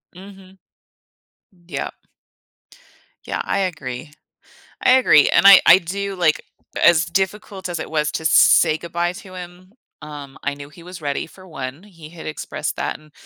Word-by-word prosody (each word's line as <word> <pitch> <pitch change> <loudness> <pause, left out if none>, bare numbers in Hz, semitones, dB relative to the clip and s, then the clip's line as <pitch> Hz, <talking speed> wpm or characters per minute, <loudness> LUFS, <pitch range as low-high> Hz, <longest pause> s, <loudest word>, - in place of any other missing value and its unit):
Mhm. 190 0 -14 1.1
Yep. - - -5 1.3
Yeah, - - -3
I 200 - -1
agree. 150 -6 -4 0.7
I - - +5
agree, 255 - +5
and - - +3
I 195 -1 +10
I 170 - +9
do, 195 +3 -5
like 170 -4 +1 0.4
as 170 -1 +5
difficult 190 +1 -3
as 170 -2 -4
it - - -6
was 150 -1 -1
to 160 - -4
say 160 0 +5
goodbye 170 +1 -3
to 185 0 -12
him, 180 +1 -11 0.3
um, 145 -2 -10
I - - -1
knew 140 0 -11
he 160 +3 -16
was 180 -1 -10
ready 145 -2 -3
for 185 +3 -17
1, 140 -1 -7
he 165 -7 -14
had 170 -1 -11
expressed 155 0 -5
that, - - -4
and 155 0 -21
170 Hz, 160 wpm, -20 LUFS, 155-185 Hz, 1.3 s, I